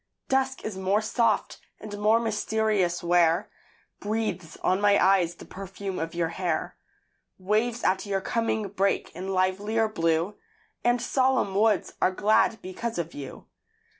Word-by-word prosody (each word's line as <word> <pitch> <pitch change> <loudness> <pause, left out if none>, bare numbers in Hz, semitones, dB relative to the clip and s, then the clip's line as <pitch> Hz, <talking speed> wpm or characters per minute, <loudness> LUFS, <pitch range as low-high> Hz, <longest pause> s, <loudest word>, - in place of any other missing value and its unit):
Dusk 265 0 0
is 205 -3 -4
more 190 +2 +2
soft 220 -1 0 0.2
and 210 -1 -7
more 215 +2 +4
mysterious 215 -5 0
where 175 +2 +3 0.5
Breathes 210 -5 -3
on 185 +2 +2
my 205 -1 +5
eyes 180 -3 +3
the - - -12
perfume 195 0 -6
of 165 +1 -4
your 170 -1 0
hair. 170 -1 -2 0.6
Waves 220 +5 0
at 190 +2 +1
your 195 -1 0
coming 220 0 -1
break 195 0 0
in 185 +2 -6
livelier 195 +4 +1
blue; 165 0 0 0.5
And 240 0 +3
solemn 255 -4 +1
woods 210 0 +2
are - - +4
glad 215 +3 +2
because 225 +5 -4
of 170 -1 -3
you. 140 -2 -9
200 Hz, 140 wpm, -26 LUFS, 185-220 Hz, 0.6 s, my